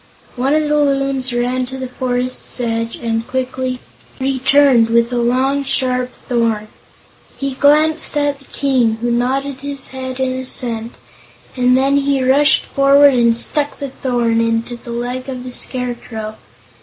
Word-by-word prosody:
One 265 +4 +1
of 310 -1 +1
the 300 0 +2
Loons 275 -2 0
ran 250 +1 -1
to 265 +1 -7
the 260 -1 -5
forest's 250 0 -3
edge 230 -1 -2
and 230 -1 -3
quickly 255 0 -3 0.4
returned 265 -2 +3
with 235 +1 +2
a 245 - 0
long, 260 +4 +1
sharp 255 -2 0 0.2
thorn. 225 -3 0 0.7
He 275 0 -2
glanced 305 +3 +3
at 290 -1 0
the 275 - -19
King, 255 -6 +1
who 240 0 0
nodded 260 +3 -1
his 280 -1 -2
head 260 0 -6
in 260 -1 0
assent, 240 -3 -3 0.6
and 250 0 +3
then 275 +1 +2
he 275 -1 +1
rushed 280 +3 +4
forward 280 0 +5
and 235 -2 +3
stuck 290 +4 0
the 280 - -5
thorn 240 -3 0
into 230 +1 -1
the 235 - -13
leg 245 +2 -4
of 255 -2 -5
the 250 -1 -8
Scarecrow. 240 -4 -2
255 Hz, 155 wpm, -17 LUFS, 240-275 Hz, 0.7 s, forward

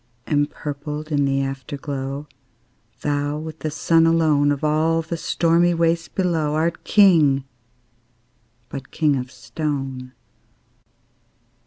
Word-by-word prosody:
Empurpled 150 +1 -3
in 145 -1 +2
the 135 0 +1
Afterglow, 135 +1 -5 0.7
Thou, 145 0 -1
with 160 0 -7
the 155 - -2
Sun 165 +1 +3
alone, 155 -3 +3
Of 145 0 -2
all 160 +2 +2
the 165 +1 -4
stormy 170 +1 +2
waste 165 0 0
below, 165 -5 0
Art 165 +2 -1
King, 160 -10 +5 1.2
but 135 0 -8
king 150 -3 +1
of 125 -1 -4
stone! 135 -1 -4
150 Hz, 110 wpm, -22 LUFS, 140-165 Hz, 1.2 s, King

